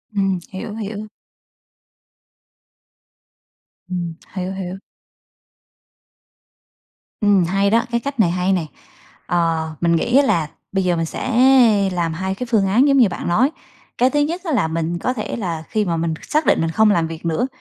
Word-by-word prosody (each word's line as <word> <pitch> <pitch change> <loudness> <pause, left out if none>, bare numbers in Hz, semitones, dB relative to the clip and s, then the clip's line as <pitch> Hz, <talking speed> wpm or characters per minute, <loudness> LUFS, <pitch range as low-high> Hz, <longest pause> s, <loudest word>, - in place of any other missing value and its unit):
Ừm, 195 -2 +1
hiểu, 210 +2 -6
hiểu. 215 -1 -5 2.8
Ừm, 175 -2 -3 0.2
hiểu, 185 0 -3
hiểu. 190 -1 -5 2.4
Ừm, 205 -3 +4
hay 195 +3 +1
đó, 230 +3 +2
cái 235 - +1
cách 280 0 -6
này 175 -6 +4
hay 180 +2 +1
này! 165 -5 -2 0.6
Ờ, 165 -2 0
mình 170 -1 +3
nghĩ 240 +10 +2
á 285 - +6
là 165 - +1 0.2
bây 195 0 0
giờ 180 -1 +1
mình 165 -1 -1
sẽ 255 +9 -4 0.6
làm 170 -2 -1
hai 190 +3 -3
cái 250 +4 -5
phương 210 -4 +3
án 245 +9 +4
giống 275 - +4
như 240 -6 +5
bạn 175 - -5
nói. 230 - +3 0.5
Cái 250 - +4
thứ 295 - 0
nhất 325 +5 -1
á 330 - -3
là 210 - +2
mình 165 +1 -2
có 250 - -1
thể 220 -4 -4
là 170 -7 -4
khi 215 -1 0
mà 170 -3 -1
mình 165 0 -1
xác 305 +1 0
định - - +3
mình 165 - 0
không 215 +5 +4
làm 170 -4 +1
việc 165 +1 -8
nữa, 165 +10 0
190 Hz, 175 wpm, -20 LUFS, 170-230 Hz, 2.8 s, á